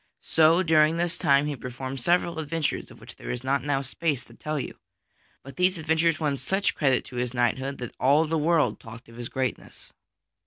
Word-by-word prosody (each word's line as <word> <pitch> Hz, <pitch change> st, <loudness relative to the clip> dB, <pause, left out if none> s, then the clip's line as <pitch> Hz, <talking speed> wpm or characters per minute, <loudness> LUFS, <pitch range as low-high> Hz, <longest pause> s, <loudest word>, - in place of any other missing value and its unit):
So 165 Hz, +3 st, +4 dB
during 160 Hz, -1 st, +4 dB
this 175 Hz, +1 st, -1 dB
time 140 Hz, -1 st, +3 dB
he 150 Hz, -1 st, -2 dB
performed 130 Hz, +1 st, -6 dB
several 170 Hz, +1 st, +1 dB
adventures 160 Hz, 0 st, -2 dB
of -, -, -15 dB
which -, -, -12 dB
there -, -, -9 dB
is 125 Hz, 0 st, -3 dB
not 135 Hz, +1 st, 0 dB
now 140 Hz, -1 st, 0 dB
space 140 Hz, 0 st, -2 dB
to -, -, -18 dB
tell 155 Hz, -1 st, -4 dB
you. 130 Hz, -, -6 dB, 0.6 s
But 135 Hz, -, -12 dB
these 180 Hz, 0 st, +2 dB
adventures 160 Hz, 0 st, +1 dB
won 145 Hz, -3 st, 0 dB
such 190 Hz, +10 st, 0 dB
credit 135 Hz, -5 st, +1 dB
to 125 Hz, -, -9 dB
his 125 Hz, 0 st, -2 dB
knighthood 130 Hz, +3 st, 0 dB
that 125 Hz, -2 st, -7 dB
all 145 Hz, +5 st, +4 dB
the 160 Hz, +1 st, -1 dB
world 160 Hz, 0 st, +2 dB
talked 115 Hz, +1 st, -12 dB
of 115 Hz, -, -14 dB
his 120 Hz, -1 st, -6 dB
greatness. 130 Hz, -1 st, -4 dB
145 Hz, 200 wpm, -26 LUFS, 130-160 Hz, 0.6 s, So